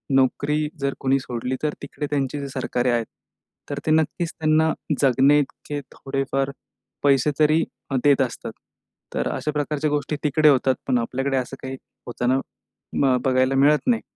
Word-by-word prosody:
नोकरी 145 +3 +2
जर 140 0 0
कोणी 135 0 +2
सोडली, 125 0 -3
तर 150 - 0
तिकडे 145 +1 -5
त्यांची 140 0 -1
जे 140 - -4
सरकारे 125 -1 -1
आहेत, 120 -1 +1 0.6
तर - - -3
ते 155 - +1
नक्कीच 160 +2 +1
त्यांना 160 0 +3 0.3
जगण्याइतके 140 +2 +2
थोडेफार 135 0 -2 0.5
पैसे 140 0 +4
तरी 155 +2 +4 0.3
अ, - - 0
देत 140 -1 +5
असतात. 125 -3 -3 0.6
तर - - -1
अशा 150 - -2
प्रकारच्या 150 0 -1
गोष्टी 145 0 -1
तिकडे 150 +1 +4
होतात, 130 -1 +3
पण 130 - +3
आपल्याकडे 135 +3 -1
असं 130 +1 -3
काही 130 0 -5 0.3
होताना 125 +2 +1 0.6
म 130 -2 +4
बघायला 130 0 +3
मिळत 145 - +4
नाही. 235 -2 +3
140 Hz, 155 wpm, -23 LUFS, 130-150 Hz, 0.6 s, देत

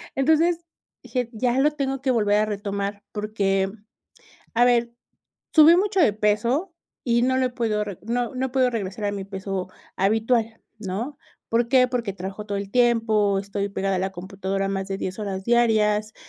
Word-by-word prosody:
Entonces, 320 +5 +3 0.4
dije: 250 -3 -2
"Ya 245 +3 0
lo 295 +3 +4
tengo 270 -3 -3
que 265 -1 +1
volver 210 -3 +2
a 215 - +2
retomar", 200 -1 -4
porque, 200 -2 0 0.8
a 240 - +5
ver, 235 -1 +2 0.6
subí 315 +1 +9
mucho 390 0 +1
de 225 -10 +4
peso, 235 - 0 0.3
y 235 -1 +2
no 260 +1 +2
lo 260 - +2
he - - -8
podido 225 -4 -1
reg 200 -4 -6
no 240 +3 -2
no 260 +1 -1
he - - -9
podido 255 -1 +2
regresar 205 -2 -4
a 205 - 0
mi 200 -1 -4
peso 190 -1 -4 0.3
habitual, 225 +3 +1 0.2
¿no? 220 +8 -4 0.3
¿Por 235 +1 +2
qué?, 255 -1 +5
porque 235 -5 -2
trabajo 195 +3 -7
todo 205 -1 -3
el 200 -1 -6
tiempo, 225 -5 +3
estoy 200 0 -3
pegada 195 -1 -1
a - - -1
la 190 +1 -2
computadora 195 +1 -3
más 195 0 -3
de 195 - -3
10 185 -1 -4
horas 195 -2 -4
diarias, 215 -3 +2
215 Hz, 180 wpm, -24 LUFS, 200-245 Hz, 0.8 s, subí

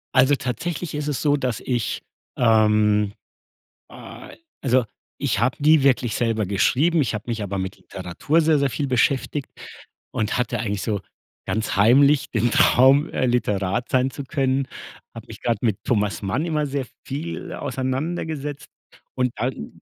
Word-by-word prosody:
Also 130 +2 +5
tatsächlich 160 +5 -4
ist 150 0 -2
es 145 - -2
so, 145 -1 +3
dass 130 -5 -2
ich, 120 -4 -2 0.4
ähm 105 -3 +3 0.8
ah - - -11 0.3
also 130 -1 +3 0.4
ich - - 0
habe 120 +2 +1
nie 150 0 +5
wirklich 125 -4 +2
selber 115 -4 0
geschrieben. 150 - +2
Ich 120 - -1
habe 105 - -5
mich 115 -3 -2
aber 100 -1 -3
mit 95 0 -4
Literatur 95 - -1
sehr, 155 -1 +3
sehr 140 -2 +1
viel 145 +2 -2
beschäftigt 135 +2 0 0.6
und 110 +2 -1
hatte 125 - -1
eigentlich 105 -3 -2
so 105 -2 -2 0.5
ganz 110 0 -1
heimlich 135 +8 +4
den 120 +1 +1
Traum, 135 +6 +5
äh, 130 - 0
Literat 105 -3 0
sein 130 0 +2
zu 140 - -7
können. 135 -1 0 0.5
Habe - - -10
mich - - -10
grad 115 -4 0
mit 105 -4 -1
Thomas 105 -3 0
Mann 115 - -1
immer 155 -3 0
sehr 140 -2 -3 0.2
viel 155 +5 -5
auseinandergesetzt. 145 +2 -3 0.5
Und 125 -1 0
dann 125 - -5
125 Hz, 155 wpm, -23 LUFS, 110-145 Hz, 0.8 s, Also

